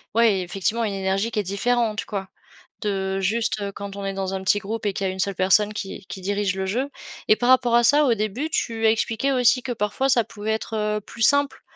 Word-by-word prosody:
ouais 225 -5 +4
effectivement 195 +6 -1
une 210 -3 -1
énergie 195 +3 -1
qui 215 - -1
est 205 - 0
différente, 220 +3 0
quoi. 195 -2 -5 0.5
De 195 -2 -1
juste, 215 +2 0
heu, 200 - -3
quand 200 0 -8
on 200 - -6
est 195 - -2
dans 195 0 -3
un 190 0 -4
petit 205 +2 +3
groupe 215 +2 -5
et 200 - 0
qu'il 195 - -3
y - - -1
a - - -3
une 190 - -10
seule 195 0 0
personne 205 +3 +3
qui 195 -2 -6
qui 195 - -7
dirige 200 0 -1
le 190 - -2
jeu. 245 +9 -1 0.4
Et 215 - +7
par 245 +1 0
rapport 250 -2 +4
à 240 - +5
ça, 290 +4 +5
au 245 - +3
début 220 +8 -2
tu 225 -7 -1
as - - +6
expliqué 225 +4 0
aussi 250 0 +3
que 260 - -4
parfois 235 +4 -1
ça 245 -3 +4
pouvait 215 0 -5
être, 220 0 -3
heu, 210 0 -1
plus 230 - -11
simple 285 +4 +3
210 Hz, 250 wpm, -23 LUFS, 195-235 Hz, 0.5 s, Et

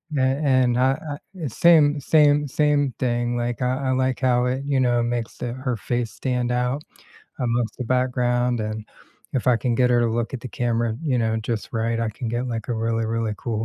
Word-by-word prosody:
a - - +1
and 130 -2 +2
uh 130 +1 +3 0.2
uh - - -6 0.3
uh, - - -1
same 150 +2 +4
same 145 0 +4
same 145 -2 +1
thing, 120 -1 0
like, 120 +1 -2
I 130 +2 -1
I - - +2
like 130 -1 0
how 125 -1 +2
it, 130 +2 -1
you 140 -2 0
know, 120 -2 +2
makes 120 -1 -3
the 120 -1 -4
her 130 -1 -2
face 120 +1 -2
stand 125 -1 -2
out 125 +4 -1 0.6
amongst 120 -2 -1
the 125 - -3
background, 125 -1 +1
and 110 0 -4 0.5
if 130 - -2
I 125 -2 +5
can 115 +1 -1
get 125 -1 +3
her 120 - +4
to 120 - +2
look 115 +3 -2
at 120 - -4
the 125 - -7
camera, 115 -1 -1
you 130 -6 +1
know, 110 -1 +1
just 110 0 -3
right, 115 0 -1
I 115 - 0
can 115 +3 -6
get, 120 +2 -2
like, 115 -3 -4
a 120 - -2
really, 115 0 -1
really 115 -1 -1
cool 110 -2 -2
125 Hz, 215 wpm, -23 LUFS, 115-130 Hz, 0.6 s, I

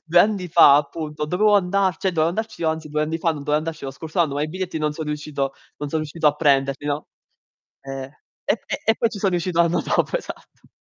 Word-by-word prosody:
2 170 +1 +3
anni 195 -2 +3
fa, 140 -2 +7
appunto, 150 +1 -3
dovevo 205 +6 +3
andar 190 -2 +2
cioè 190 -1 0
dovevo 160 -1 +2
andarci 220 -3 -4
anzi 160 -1 -1
2 150 +1 0
anni 160 +2 -2
fa, 165 - +1
non 155 - -3
dovevo 150 +1 +1
andarci 160 -1 -5
lo 135 - -4
scorso 160 +5 -7
anno, 145 -4 +1
ma 145 - -1
i 155 - -1
biglietti 185 -1 -4
non 150 -1 0
so 160 - -5
riuscito 150 -2 -3 0.2
non 145 0 -5
so 160 - -2
riuscito 155 +1 -2
a 150 - +5
prenderli, 140 -2 +1
no. 145 +1 -2 0.7
Eh. 135 -1 -6 0.4
E - - +1
e - - -3
e 225 - +4
poi 230 - +1
ci 210 - -7
so 195 - +2
riuscito 175 -1 0
anno 170 0 +3
dopo, - - 0
esatto. - - -12
160 Hz, 235 wpm, -22 LUFS, 150-180 Hz, 0.7 s, fa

